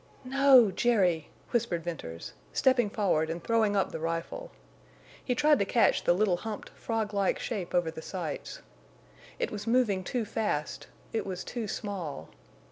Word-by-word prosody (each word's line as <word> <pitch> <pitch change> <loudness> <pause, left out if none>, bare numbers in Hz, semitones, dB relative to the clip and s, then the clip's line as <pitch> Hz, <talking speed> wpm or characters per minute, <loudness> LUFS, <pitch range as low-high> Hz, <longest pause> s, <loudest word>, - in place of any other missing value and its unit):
"No—Jerry!" 240 - +4 0.2
whispered 220 -9 0
Venters, 140 - -6 0.2
stepping 255 -5 +3
forward 185 -7 +1
and 170 +1 -4
throwing 220 -3 +2
up 195 - +1
the - - -5
rifle. 165 - -3 0.7
He 250 - 0
tried 295 +1 +4
to 200 - +2
catch 230 +4 +3
the - - +5
little 185 -1 +2
humped, 215 +2 -6
frog 220 -2 -3
like 200 -1 +1
shape 195 -8 -4
over 175 -2 +2
the 160 - -8
sights. 175 -2 -5 0.7
It - - -2
was 205 +1 -6
moving 225 -6 +2
too 235 +4 -2
fast; 210 -9 -2 0.3
it 225 - 0
was 185 -1 -5
too 235 -3 -4
small. 195 -8 -5
205 Hz, 150 wpm, -29 LUFS, 175-235 Hz, 0.7 s, the